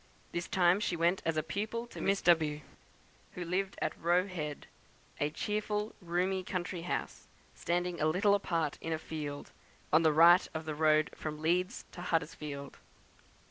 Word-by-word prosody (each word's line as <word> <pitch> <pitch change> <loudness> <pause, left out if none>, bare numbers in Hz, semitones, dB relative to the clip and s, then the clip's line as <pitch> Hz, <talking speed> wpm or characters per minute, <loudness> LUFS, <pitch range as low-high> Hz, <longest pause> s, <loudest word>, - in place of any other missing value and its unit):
This 170 0 -3
time 180 +1 +3
she 185 - -1
went 170 +3 +2
as 165 -1 0
a 155 - +1
pupil 215 +8 -3
to 235 - -9
Miss 195 0 +1
W, 155 -3 +3 0.7
who 180 - -4
lived 190 +3 -1
at - - -1
Roe 175 +2 +3
Head, 155 -6 -5 0.5
a 145 - +1
cheerful 210 +5 -2
roomy 180 +2 0
country 180 -1 -3
house, 175 - -4 0.3
standing 175 0 -2
a 155 - +3
little 195 +6 +3
apart 165 -7 0
in 165 - -2
a - - 0
field, 150 -2 -6 0.4
on 155 - +7
the 160 -1 +4
right 170 +4 +7
of 160 0 -4
the 155 - -3
road 155 0 +3
from 150 -1 -5
Leeds 180 +6 0
to 175 - -9
Huddersfield. 150 -4 -3
170 Hz, 165 wpm, -32 LUFS, 155-185 Hz, 0.7 s, on